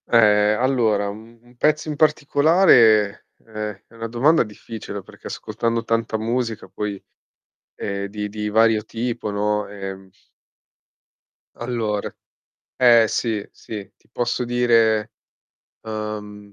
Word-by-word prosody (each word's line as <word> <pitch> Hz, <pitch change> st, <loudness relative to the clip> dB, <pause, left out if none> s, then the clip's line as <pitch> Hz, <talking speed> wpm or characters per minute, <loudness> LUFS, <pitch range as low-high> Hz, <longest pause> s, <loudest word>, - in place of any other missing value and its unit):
Ehm, 105 Hz, -2 st, +4 dB
allora 115 Hz, -6 st, +2 dB
u -, -, -5 dB
un 115 Hz, +3 st, -16 dB
pezzo 150 Hz, +3 st, +1 dB
in 150 Hz, -, -3 dB
particolare, 140 Hz, -, +4 dB, 0.2 s
ehm, 105 Hz, -2 st, -6 dB
è -, -, -24 dB
una 115 Hz, 0 st, -5 dB
domanda 130 Hz, +8 st, +3 dB
difficile 105 Hz, -2 st, -8 dB
perché -, -, -12 dB
ascoltando 115 Hz, +1 st, -2 dB
tanta 115 Hz, -1 st, -1 dB
musica 115 Hz, 0 st, -2 dB
poi, 105 Hz, -2 st, -5 dB, 0.7 s
ehm, 100 Hz, 0 st, -4 dB
di 105 Hz, +1 st, -4 dB
di 105 Hz, 0 st, -4 dB
vario 110 Hz, 0 st, +3 dB
tipo, 115 Hz, 0 st, -4 dB
no, 105 Hz, +1 st, 0 dB
ehm 95 Hz, -1 st, -8 dB, 1.5 s
Allora 115 Hz, -4 st, -3 dB, 0.6 s
eh, 120 Hz, -3 st, +6 dB
sì, 110 Hz, -3 st, -2 dB
sì, 105 Hz, -3 st, -8 dB
ti -, -, -33 dB
posso 120 Hz, 0 st, -1 dB
dire, 115 Hz, -2 st, +2 dB, 0.7 s
ehm 105 Hz, -2 st, -6 dB
110 Hz, 115 wpm, -22 LUFS, 105-120 Hz, 1.5 s, eh